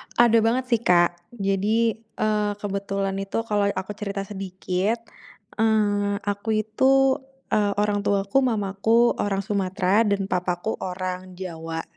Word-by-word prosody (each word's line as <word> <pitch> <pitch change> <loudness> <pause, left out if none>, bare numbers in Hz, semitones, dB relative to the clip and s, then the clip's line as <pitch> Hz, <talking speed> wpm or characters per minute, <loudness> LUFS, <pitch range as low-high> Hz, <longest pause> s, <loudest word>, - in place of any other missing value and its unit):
Ada 235 -1 +5
banget 230 +4 +2
sih, 235 - +4
Kak. 175 -5 +4 0.2
Jadi, 210 +3 +1
eee, 215 -2 -1
kebetulan 195 -1 -2
itu 195 +3 -2
kalau 205 -2 +1
aku 190 +1 -4
cerita 200 -1 -3
sedikit, 195 +2 -2 0.6
eee, 205 -2 +2
aku 205 +2 -3
itu, 265 +5 +3 0.3
eee 205 -1 +2
orang 205 -1 +1
tuaku, 200 +3 +1
mamaku 220 +1 +2
orang 195 -1 0
Sumatera 195 +1 +1
dan 200 -1 0
papaku 180 +3 -1
orang 185 0 -5
Jawa. 165 -3 -5
200 Hz, 125 wpm, -24 LUFS, 190-220 Hz, 0.6 s, Ada